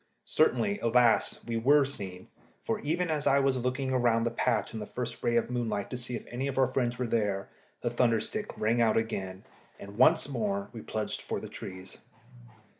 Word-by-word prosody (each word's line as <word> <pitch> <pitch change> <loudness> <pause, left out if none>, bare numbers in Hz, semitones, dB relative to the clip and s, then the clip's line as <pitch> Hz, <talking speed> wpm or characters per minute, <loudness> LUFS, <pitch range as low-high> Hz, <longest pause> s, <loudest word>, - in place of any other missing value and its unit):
Certainly, 205 0 +2
alas! 120 0 +3
we 115 -1 -2
were 140 +5 +5
seen, 95 -9 -5 0.4
for - - -1
even 165 +3 -1
as 150 -2 -1
I 140 - +5
was 135 -2 +2
looking 130 +1 -1
round 120 -2 +2
the 120 - 0
patch 120 0 0
in 110 - -4
the 105 - -6
first 120 -1 -5
ray 120 - +1
of 115 - +3
the 125 - -7
moonlight 115 -5 -2
to 125 - -3
see 125 0 -3
if - - -6
any 130 +3 -2
of 135 - -4
our 135 - +5
friends 125 -2 -1
were 125 - -1
there, 105 -4 -1 0.3
the 120 - -1
thunder 120 -2 +3
stick 210 - -4
rang 115 +2 +2
out 115 -2 +3
again, 95 -4 -3 0.4
and 100 +2 -10
once 130 - +5
more 100 -7 -2
we 115 - -7
plunged 110 0 -3
for - - -3
the - - -8
trees. 95 0 -9
120 Hz, 205 wpm, -29 LUFS, 110-130 Hz, 0.4 s, were